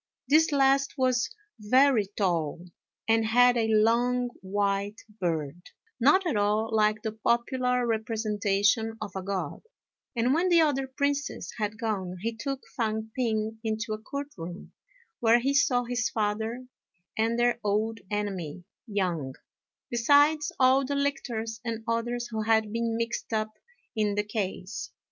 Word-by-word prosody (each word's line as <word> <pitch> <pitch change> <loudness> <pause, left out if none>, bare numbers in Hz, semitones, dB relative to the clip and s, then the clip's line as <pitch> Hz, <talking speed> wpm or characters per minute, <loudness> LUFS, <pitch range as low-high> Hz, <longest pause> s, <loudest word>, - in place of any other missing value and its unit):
This 310 +4 +4
last 275 -1 +3
was 255 -2 +2 0.3
very 250 0 +4
tall, 170 -4 0 0.4
and 225 0 +3
had 245 +3 +5
a 230 -2 +1
long 240 +3 +3
white 200 +2 -1 0.2
beard, 165 -2 -2 0.4
not 295 +10 +4
at 320 -8 0
all 210 +2 +1
like 215 0 +2
the 220 - -2
popular 250 +3 0
representation 220 -1 0
of 215 -2 -5
a 190 - -2
God; 185 -5 -4 0.5
and 240 +2 +2
when 350 +4 +2
the 340 -1 +5
other 280 -4 +2
princes 280 +2 -2
had 210 0 -2
gone, 190 -5 -2
he 230 +2 -2
took 275 +2 -4
Fang 220 -2 -2
p'ing 220 -3 -1
into 220 0 -2
a 215 - -4
court 280 +5 -5
room, 175 +2 -8 0.5
where 235 0 +5
he 270 +3 0
saw 250 -3 +3
his 245 -1 -1
father 220 +3 -2 0.5
and 225 +1 +1
their 240 0 +2
old 215 +2 0
enemy, 190 -5 -3 0.2
Yang, 175 - -2 0.6
besides 290 +5 +4
all 260 +1 +5
the 280 +2 -2
lictors 230 -6 -2
and 230 -1 -4
others 240 +1 -1
who 220 -1 -2
had 220 -1 +2
been 230 0 -1
mixed 230 +1 -3
up 215 0 -1 0.4
in 210 -2 +1
the 210 - +1
case. 195 -3 -4
225 Hz, 145 wpm, -28 LUFS, 210-250 Hz, 0.6 s, had